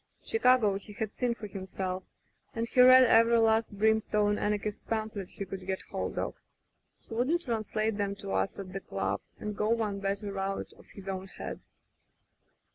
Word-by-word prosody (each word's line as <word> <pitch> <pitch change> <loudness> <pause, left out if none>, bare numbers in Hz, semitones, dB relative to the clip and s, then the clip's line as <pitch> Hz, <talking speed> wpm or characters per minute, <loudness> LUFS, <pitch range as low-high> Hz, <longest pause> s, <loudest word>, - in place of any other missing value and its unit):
Chicago 250 - +3
he 205 +1 -12
had 215 0 -4
seen 245 -2 0
for 220 - -8
himself, 190 -1 -4 0.5
and 230 0 -1
he 250 - +4
read 255 +1 +9
every 230 -1 +5
last 225 0 +3
brim 220 +2 +2
stone 210 -1 +1
anarchist 210 0 -2
pamphlet 215 -4 -3
he 200 - -6
could 190 0 -7
get 190 0 -2
hold - - -3
of. - - -1 0.7
He - - -11
would 260 +9 +2
translate 220 - -1
'em 200 -1 -1
to 200 -1 -6
us - - 0
at 190 -1 -7
the 195 - -3
club - - -2 0.2
and 210 -1 -4
go 210 +1 0
one 220 -3 0
better 200 0 -2
out 195 0 -3
of - - -19
his 195 -1 -10
own 190 0 -4
head. - - -7
210 Hz, 180 wpm, -30 LUFS, 195-225 Hz, 0.7 s, read